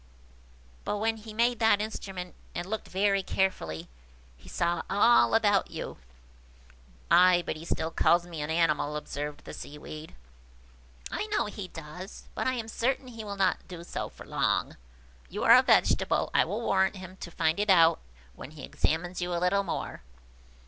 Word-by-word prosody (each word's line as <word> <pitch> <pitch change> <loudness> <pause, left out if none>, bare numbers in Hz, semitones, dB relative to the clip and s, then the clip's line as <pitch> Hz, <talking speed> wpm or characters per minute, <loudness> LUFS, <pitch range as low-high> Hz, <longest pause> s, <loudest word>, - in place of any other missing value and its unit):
But 210 - -2
when 225 +2 0
he 215 0 -10
made 235 +2 +1
that 220 -3 +4
instrument, 195 -4 -5 0.2
and 175 - -3
looked 215 +3 -4
very 195 +1 +2
carefully, 90 - -1 0.5
he - - -16
saw 170 0 0
all 225 +3 +5
about 205 -3 +3
you." - - -6 1.1
"Ay, 180 -1 +6
but - - -2
he 155 - -9
still 165 -1 -2
calls 175 +1 +3
me 170 -3 -6
an 150 - -3
animal," 155 -3 +1
observed 150 0 -5
the - - -8
Seaweed. 155 +1 -9 1.0
"I 430 - -2
know 430 - 0
he 205 -2 -6
does, 175 +4 -10
but - - -2
I 260 - +2
am 230 -3 -4
certain 255 +3 -1
he 230 -2 -8
will 205 -1 -5
not 195 -1 0
do 175 -2 -8
so - - -5
long! - - 0
If - - -17 0.6
you - - -3
are - - +9
a - - +8
vegetable, - - +3
I - - +4
will 205 +7 -3
warrant 190 -3 +2
him 185 -1 -9
to 175 - -7
find 160 +1 0
it 210 0 0
out 165 -3 +6 0.3
when 95 - -10
he 150 -2 -11
examines 175 +3 -1
you 175 0 -2
a - - 0
little 180 +3 +2
more." 180 - -4
185 Hz, 175 wpm, -29 LUFS, 165-210 Hz, 1.1 s, are